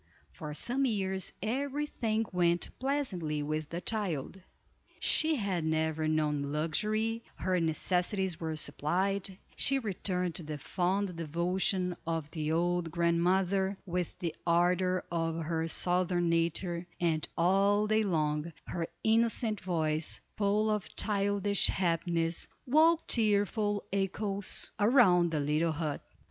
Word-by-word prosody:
For 150 -1 -7
some 255 - 0
years 190 -5 0
every 275 +6 -1
thing 225 -5 -1
went 175 -1 +2
pleasantly 190 - -1
with 155 0 -3
the 170 +1 -4
child; 190 -4 -2 0.6
she 315 0 +2
had 195 - -1
never 160 0 0
known 155 -2 +1
luxury, 215 +9 0
her 185 -1 0
necessities 180 +3 0
were 160 -1 -3
supplied, 185 +6 -1 0.2
she 275 - +2
returned 185 -6 -2
the 155 -2 -4
fond 185 +5 -1
devotion 180 +3 0
of 165 -2 -2
the 155 -1 -2
old 175 +1 +1
grandmother, 180 +3 +1
with 180 -1 -3
the 170 -3 -3
ardor 180 +2 +2
of 165 -1 -1
her 160 0 -1
Southern 175 0 +1
nature; 170 +1 0
and, 160 -3 0
all 195 +4 +3
day 215 +1 +2
long, 155 -4 0
her 165 -2 -3 0.2
innocent 225 -1 +2
voice, 160 -3 -1 0.2
full 210 +1 +2
of 210 -2 -3
childish 200 -1 +1
happiness, 170 -2 0 0.2
woke 320 +5 +4
cheerful 205 -1 +2
echoes 195 0 -1
around 205 -6 +5
the 155 -2 -1
little 155 +3 +1
hut. 155 -2 -3
180 Hz, 120 wpm, -31 LUFS, 165-205 Hz, 0.6 s, around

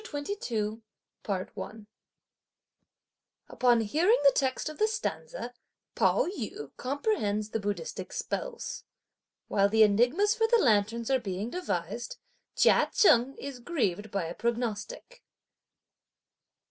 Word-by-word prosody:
CHAPTER 295 -1 -4
XXII. 220 - -3 2.7
Upon 245 -2 +3
hearing 325 - +3
the 280 - +9
text 265 +1 0
of 310 - -7
the 430 - +4
stanza, 440 - -4 0.4
Pao - - +3
yü 220 - -6
comprehends 220 - -1
the 225 - -1
Buddhistic 205 - -4
spells. - - -4 0.6
While 200 0 +3
the 220 +1 +5
enigmas 245 - +3
for 450 -1 +1
the 470 +1 +5
lanterns 230 - +2
are 265 - +3
being 205 +1 -4
devised, 235 - -3 0.4
Chia - - +4
Cheng 270 - +4
is 275 -2 -7
grieved 220 - -1
by 195 -2 -2
a 165 - -5
prognostic. 235 - -3
245 Hz, 110 wpm, -29 LUFS, -, 2.7 s, the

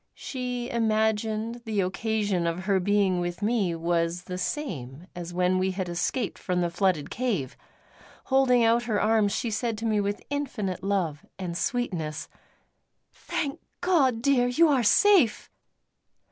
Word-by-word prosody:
She 250 -2 -4
imagined 220 0 0
the 215 -3 -1
occasion 200 -1 -1
of 170 +2 -2
her 195 0 +1
being 195 -1 +2
with 175 +2 -3
me 205 -6 +1
was 170 +1 -1
the 180 - -5
same 165 - -4
as 175 -1 -6
when 180 +1 +1
we 190 +1 +1
had 185 -1 -3
escaped 175 +5 -2
from 180 -1 -1
the 175 -1 0
flooded 175 -4 0
cave; 205 - -2 0.7
holding 260 -2 +3
out 230 +1 +3
her 215 -3 0
arms 215 -2 +3
she 230 - -2
said 225 +1 -1
to 225 - -5
me 215 -2 +2
with 205 0 -3
infinite 230 -10 -3
love 180 -7 -1
and 180 -3 -4
sweetness: 170 -7 -2 0.8
"Thank 280 -2 -4 0.2
God, 275 -11 +2
dear, 255 -3 +3
you 315 +7 +4
are 270 -4 +3
safe!" 330 - +4
205 Hz, 145 wpm, -27 LUFS, 180-240 Hz, 0.8 s, you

